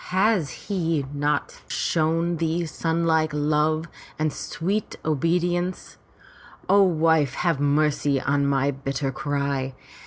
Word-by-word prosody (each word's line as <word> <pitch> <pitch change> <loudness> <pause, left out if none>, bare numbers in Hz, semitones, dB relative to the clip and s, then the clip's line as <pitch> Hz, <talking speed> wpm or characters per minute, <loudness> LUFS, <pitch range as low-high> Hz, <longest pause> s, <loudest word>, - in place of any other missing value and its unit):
Has 190 -4 +2
he 165 -7 -2
not 145 - 0
ever - - -28
shown 165 +1 +1
thee 165 +1 0
sonlike 160 -1 +1
love 155 +2 +1 0.3
and 155 -1 0
sweet 195 +6 -3
obedience? 175 +4 0 0.7
O 200 +2 +5
wife, 160 -6 +3
have 170 -5 0
mercy 145 -1 +2
on 140 +1 +1
my 140 0 +2
bitter 135 0 -3
cry. 135 -1 -2
155 Hz, 115 wpm, -24 LUFS, 140-170 Hz, 0.7 s, O